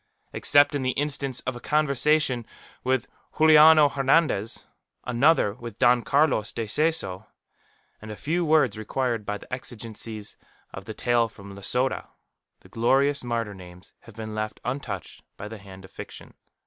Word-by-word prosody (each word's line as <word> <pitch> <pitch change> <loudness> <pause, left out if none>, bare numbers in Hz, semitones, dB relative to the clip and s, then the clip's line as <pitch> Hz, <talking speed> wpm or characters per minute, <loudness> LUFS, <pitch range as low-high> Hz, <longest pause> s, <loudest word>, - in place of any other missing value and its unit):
Except 145 0 +4
in 145 - -1
the 130 0 -1
instance 140 -2 -1
of 130 - -4
a - - -7
conversation 150 -3 +1 0.4
with 130 -1 0 0.3
Juliano 155 -1 +7
Hernandez, 135 -5 +1 0.4
another 125 -3 +3
with 115 -1 -10
Don 120 0 +4
Carlos 135 -6 +1
de 115 - -4
Seso, 110 - -1 0.7
and 110 - -10
a 105 - -6
few 165 +9 -1
words 150 -9 +2
required 115 -1 -2
by 105 - -2
the - - -13
exigencies 110 -3 -5 0.4
of - - -8
the - - -7
tale 120 -1 +1
from 100 -2 -12
Losada, 125 +7 -2 0.5
the - - -18
glorious 135 +5 +1
martyr 115 -3 -2
names 90 -1 -14
have 115 - -16
been 110 -1 -7
left 110 0 -4
untouched 120 - -5 0.2
by 100 - -7
the 110 0 -9
hand 95 -1 -13
of 95 - -17
fiction. - - -11
120 Hz, 150 wpm, -25 LUFS, 110-145 Hz, 0.7 s, Juliano